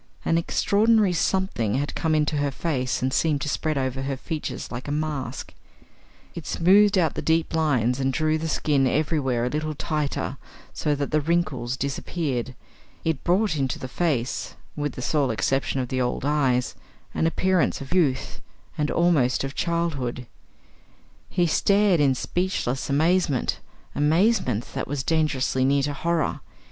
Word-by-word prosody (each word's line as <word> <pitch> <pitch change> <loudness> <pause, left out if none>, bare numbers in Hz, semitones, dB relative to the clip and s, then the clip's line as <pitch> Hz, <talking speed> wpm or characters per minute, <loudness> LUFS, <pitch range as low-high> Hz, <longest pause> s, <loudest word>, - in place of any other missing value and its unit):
An 165 - +2
extraordinary 205 +3 +3
something 170 - 0
had 145 +2 -1
come 160 -2 0
into 150 0 +1
her 145 0 +1
face 130 -4 -2
and 130 0 0
seemed 155 -3 +2
to - - -3
spread 155 0 -1
over 130 0 -2
her 135 0 -3
features 155 +3 -5
like 120 +3 -6
a - - -3
mask; 150 -3 -3 0.8
it - - -8
smoothed 200 +3 +4
out 165 -4 +2
the - - -4
deep 165 0 +1
lines 130 -6 +1
and 135 0 +1
drew 155 +2 +1
the 160 - -3
skin 145 -3 +1
everywhere 135 -5 0
a - - 0
little 155 +2 -2
tighter 145 -2 -2 0.4
so 150 -2 0
that 140 0 -3
the 155 0 +2
wrinkles 145 -6 -1
disappeared; 135 -2 -3 0.5
it 160 -4 -1
brought 190 +1 +2
into 135 -3 -1
the 130 - -6
face 130 -4 -2 0.2
with 145 -3 -2
the 125 - -6
sole 145 -2 +1
exception 135 +5 0
of 125 -2 -3
the 130 -1 -1
old 125 +1 -1
eyes 135 -4 +1 0.4
an 165 - +1
appearance 185 +1 +1
of 135 +4 -6
youth 145 -8 0 0.4
and 150 -1 +1
almost 160 -9 +2
of 135 0 -4
childhood. 150 -9 -2 1.0
He 175 -2 +1
stared 200 +2 +3
in 140 -3 +3
speechless 160 -5 -2
amazement 155 -1 +1 0.3
amazement 155 - +2
that - - -3
was 140 -1 -3
dangerously 150 -5 +1
near 140 +1 +3
to 145 +1 -1
horror. 170 +2 -1
150 Hz, 155 wpm, -24 LUFS, 130-165 Hz, 1.0 s, smoothed